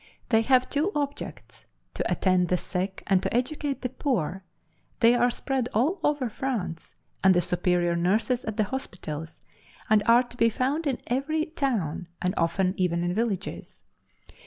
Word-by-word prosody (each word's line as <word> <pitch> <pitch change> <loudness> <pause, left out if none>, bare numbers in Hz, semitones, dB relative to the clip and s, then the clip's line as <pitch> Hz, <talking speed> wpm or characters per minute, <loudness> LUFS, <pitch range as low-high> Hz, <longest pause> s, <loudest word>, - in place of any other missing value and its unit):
They 225 -2 +4
have 255 +2 +3
two 310 +8 0
objects, 285 -1 -5 0.3
to - - -2
attend 185 -2 +2
the 180 - +2
sick 190 +2 -3
and 190 -2 +3
to - - -2
educate 275 +3 -1
the 250 - 0
poor; 195 - -2 0.6
they 235 -1 +6
are 245 0 +3
spread 255 0 -2
all 300 - +2
over 290 -4 +1
France, 215 -8 -4 0.3
are 190 - +6
the 180 -2 +5
superior 175 0 +1
nurses 215 +8 +1
at 220 -1 -4
the 215 - +3
hospitals, 165 - -6 0.5
and 215 -1 +6
are 235 +2 +6
to 245 0 -13
be 230 -1 +4
found 275 +8 -1
in 265 -3 0
every 305 +5 0
town, 220 - -2
and 180 0 0
often 180 +3 +1
even 170 -2 +1
in 175 0 0
villages. 210 -2 -3
225 Hz, 160 wpm, -27 LUFS, 180-265 Hz, 0.6 s, they